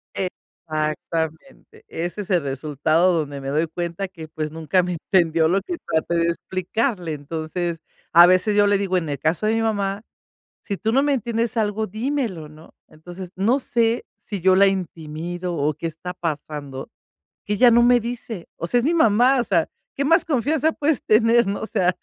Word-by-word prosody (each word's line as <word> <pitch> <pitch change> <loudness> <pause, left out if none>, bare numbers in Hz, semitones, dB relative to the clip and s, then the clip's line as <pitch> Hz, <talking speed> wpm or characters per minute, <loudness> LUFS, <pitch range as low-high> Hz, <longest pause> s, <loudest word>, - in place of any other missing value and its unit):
Exactamente. 160 - -5
Ese 175 +5 -4
es 195 - -8
el 180 -3 +3
resultado 155 +6 +1
donde 145 -2 -4
me 135 - -4
doy 155 +4 +1
cuenta 175 +3 -4
que, 165 -4 -10
pues, 155 -1 -5
nunca 165 +3 +1
me 180 0 -2
entendió 165 -2 +2
lo 190 +4 +2
que 350 - -4 0.2
traté 160 +2 0
de 170 - +2
explicarle. 185 - -2
Entonces, 160 +3 -4 0.3
a 170 +1 +10
veces 185 +4 +3
yo 205 0 +5
le 205 -1 +3
digo, 190 -2 0
en 165 -4 -2
el 140 - -3
caso 160 +8 0
de 220 +1 +2
mi 225 - +1
mamá: 200 -2 -1 0.6
"Si 200 - -4
tú 220 +3 -1
no 270 +3 +4
me 290 0 +2
entiendes 235 -1 -1
algo, 215 0 0
dímelo", 220 - -3
¿no? 155 +1 -16
Entonces, 175 +3 -10
no 220 +8 +2
sé 235 -3 0
si 200 -4 -7
yo 185 +1 +4
la 200 - +6
intimido 175 -1 -3
o 150 -1 0
qué 165 - -5
está 165 +3 -6
pasando, 150 -5 -5 0.6
que 210 - -1
ella 245 +3 +6
no 235 +1 +5
me 245 0 +5
dice. 230 -5 -6
O 170 - -4
sea, 245 - +2
es 240 - 0
mi 330 - +2
mamá. 250 -2 +4
O - - 0
sea, 175 -7 +1 0.3
¿qué 280 - -1
más 330 +3 +4
confianza 305 +2 +1
puedes 295 -3 0
tener, 230 +1 +4
¿no? 200 - -2
O - - -4
sea, 195 -6 0
185 Hz, 190 wpm, -22 LUFS, 160-225 Hz, 0.6 s, a